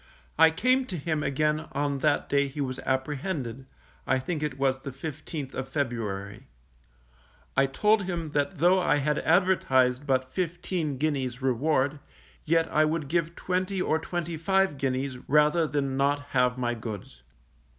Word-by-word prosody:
I 160 0 +8
came 255 +10 +2
to 185 - -4
him 155 0 -1
again 150 +2 0
on 140 -1 -1
that 145 +1 +1
day 140 0 +2
he 140 +2 -8
was 130 -2 -2
apprehended 130 -1 -2 0.4
(I 135 - +3
think 150 +4 -3
it 150 -3 -2
was 135 -1 +1
the 140 - -6
15th 145 +1 -6
of 135 0 -4
February). 115 -4 -3 1.1
I 135 0 +4
told 210 +8 +2
him 170 -4 -3
that 145 +5 -1
though 180 +5 +4
I 175 - +2
had 150 +1 +1
advertised 145 -7 +2
but 130 -1 0
fifteen 175 -4 -2
guineas 135 -3 -1
reward, 135 +2 +1 0.5
yet 165 +1 +3
I 155 - +5
would 155 -2 -1
give 170 0 0
twenty 185 +1 -1
or 160 -3 +1
twenty 170 0 -4
five 190 -2 +1
guineas, 130 -1 -1
rather 150 +3 +4
than 140 -3 -1
not 145 +1 0
have 125 -1 +2
my 120 -1 0
goods. 110 - -7
145 Hz, 155 wpm, -27 LUFS, 130-165 Hz, 1.1 s, I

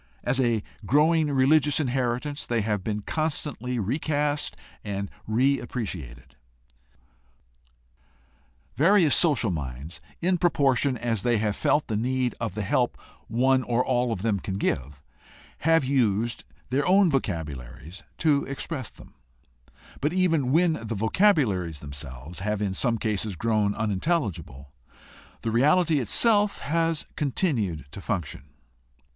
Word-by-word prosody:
As 125 +2 +1
a 115 -4 +1 0.2
growing 150 - +3
religious 140 +2 +3
inheritance 130 +1 -1
they 120 -2 0
have 105 -2 -1
been 105 0 -2
constantly 145 -5 -2
recast 145 - -1 0.3
and 100 -1 -4 0.2
reappreci 120 - -1
ated. - - -17 2.4
Various 170 -1 +5
social 140 - +3
minds, 70 +1 -6 0.2
in 180 0 +1
proportion 140 -6 +2
as 115 -3 -1
they 120 +1 +2
have 105 -1 0
felt 150 - +1
the 110 - -3
need 125 +2 0
of 115 -5 -3
the 105 - -2
help 95 - 0 0.3
one 130 +3 +2
or 125 0 0
all 125 -2 +1
of 100 -4 -3
them 105 -4 +1
can 95 +1 -4
give, 70 -6 -2 0.6
have 165 -2 +3
used 120 -4 0 0.3
their 140 +5 +1
own 190 +1 +5
vocabularies 80 - -4 0.2
to 150 -3 +2
express 135 -1 -4
them, - - -17 0.9
but 150 +3 0
even 165 -8 +2
when 165 +2 +4
the 115 0 -4
vocabularies 110 - +2
themselves 70 +2 -8
have 105 +2 -2
in 100 -2 -1
some 115 +4 +1
cases 105 -2 -2
grown 105 +1 +1
unin 105 -4 -1
telligible, 100 - -2 0.7
the 115 - -2
reality 150 +6 +3
itself 205 - +3
has 165 +1 -1
continued 120 - -1
to 100 - -8
function. 85 -9 -4
120 Hz, 130 wpm, -26 LUFS, 100-145 Hz, 2.4 s, Various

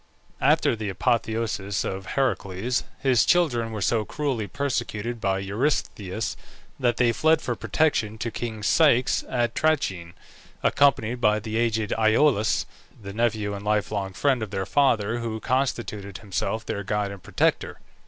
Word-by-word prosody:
After - - +3
the 110 -2 -4
apotheosis 110 0 -1
of 95 0 -4
Heracles, 120 -3 0 0.2
his 130 -4 +4
children 125 -10 +2
were 105 -3 -3
so 115 +1 +2
cruelly 130 -4 -2
persecuted 120 -4 -3
by 95 -1 +1
Eurystheus, 105 -1 -2 0.4
that 120 -3 +1
they 120 -2 +4
fled 160 +6 +3
for - - -3
protection 115 -9 0
to 115 +1 -3
king 110 -2 -5
Ceyx 130 - +3
at 120 -2 0
Trachin, 95 - 0 0.5
accompanied 125 -4 +2
by 105 -2 +4
the 110 0 -6
aged 110 -2 0
Iolaus, 110 0 +3 0.3
the 100 -2 -8
nephew 110 -2 0
and 100 0 -6
life 105 0 0
long 100 -2 -3
friend 130 +4 +1
of 110 - -3
their 95 -1 -3
father, 120 -3 +2
who 115 -2 -3
constituted 105 -6 -2
himself 105 +2 -3
their 100 - -3
guide 105 0 -1
and 100 -1 -9
protector. - - 0
110 Hz, 145 wpm, -25 LUFS, 100-125 Hz, 0.5 s, his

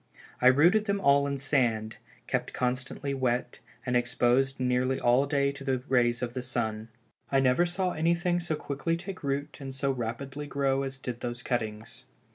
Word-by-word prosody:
I 125 - +6
rooted 170 +11 +5
them 200 -1 0
all 140 -4 +4
in 140 0 -2
sand, 120 -6 0 0.3
kept - - -2
constantly 130 +2 -2
wet, 125 -2 -1 0.3
and 125 -1 0
exposed 125 +2 +2
nearly 130 +1 +1
all 125 +4 +3
day 140 -1 +1
to 140 0 -9
the 130 -2 -1
rays 120 -1 +2
of 120 -1 -3
the 130 - -3
sun. 110 -3 -3 0.4
I 135 - +4
never 135 +6 +3
saw 180 +1 0
anything 170 +2 +1
so 175 -2 -2
quickly 150 +3 -2
take 190 +2 -7
root 140 +2 -2
and 135 -1 -6
so 135 0 0
rapidly 135 +4 -4
grow 135 -1 0
as 135 0 -4
did 125 -3 -5
those 120 0 -5
cuttings. 110 -2 -4
135 Hz, 175 wpm, -28 LUFS, 125-145 Hz, 0.4 s, I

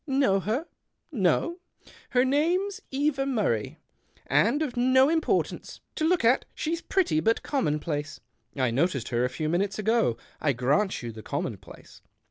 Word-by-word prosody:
Know 270 -8 +2
her? 220 - -2 0.5
No? 255 - +1 0.5
Her 250 0 +3
name's 345 +9 +1
Eva 275 0 0
Murray, 205 - -1 0.5
and 230 - +2
of 265 -5 -4
no 260 +3 +4
importance. 320 0 -1
To 310 - -1
look 345 -6 +2
at, 245 +3 +4
she's 335 +2 -2
pretty 365 - +1
but 225 +8 +1
commonplace." 150 - -2 0.2
" - - -47
I 130 -4 +1
noticed 135 -2 0
her 120 0 0
a 125 - +1
few 155 +4 -3
minutes 190 +5 0
ago. 220 - +1 0.2
I 145 - +2
grant 140 - 0
you 120 - -4
the 110 0 -10
commonplace." - - -6
220 Hz, 150 wpm, -27 LUFS, -, 0.5 s, no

